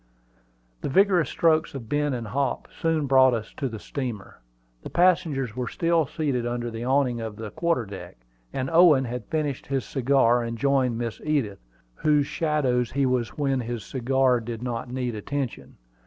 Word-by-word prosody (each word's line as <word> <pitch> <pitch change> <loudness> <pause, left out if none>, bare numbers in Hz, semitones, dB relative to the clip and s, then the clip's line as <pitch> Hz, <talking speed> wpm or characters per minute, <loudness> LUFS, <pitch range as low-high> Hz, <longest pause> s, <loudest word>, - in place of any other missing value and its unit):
The - - -2
vigorous 185 +1 +3
strokes 155 -3 +2
of 120 -5 -7
Ben 145 +3 0
and 115 -3 -5
Hop 135 +1 -1
soon 160 -2 0
brought 130 -2 +5
us 110 -1 -6
to 135 -3 -2
the 115 - -6
steamer. 120 -4 -6 0.4
The - - -8
passengers 155 - +2
were 125 -1 -3
still 165 0 +1
seated 140 -6 -1
under 120 0 -3
the 115 +1 -5
awning 130 -2 +1
of 110 -2 -5
the 110 -1 -7
quarter 165 -6 0
deck; 100 -10 -9 0.3
and 130 - -2
Owen 165 -6 +6
had 120 -2 -5
finished 150 -4 -2
his 135 -2 -1
cigar 130 -2 +3
and 115 0 -4
joined 130 -2 +1
Miss 115 -1 -4
Edith, 140 -10 -1 0.3
whose 150 - +2
shadow 145 -6 +1
he 135 +3 -1
was 125 -3 -1
when 135 -3 +1
his 120 -2 -4
cigar 130 0 +1
did 115 0 -6
not 120 0 -4
need 125 -1 -2
attention. 130 +4 -5
130 Hz, 170 wpm, -25 LUFS, 120-145 Hz, 0.4 s, Owen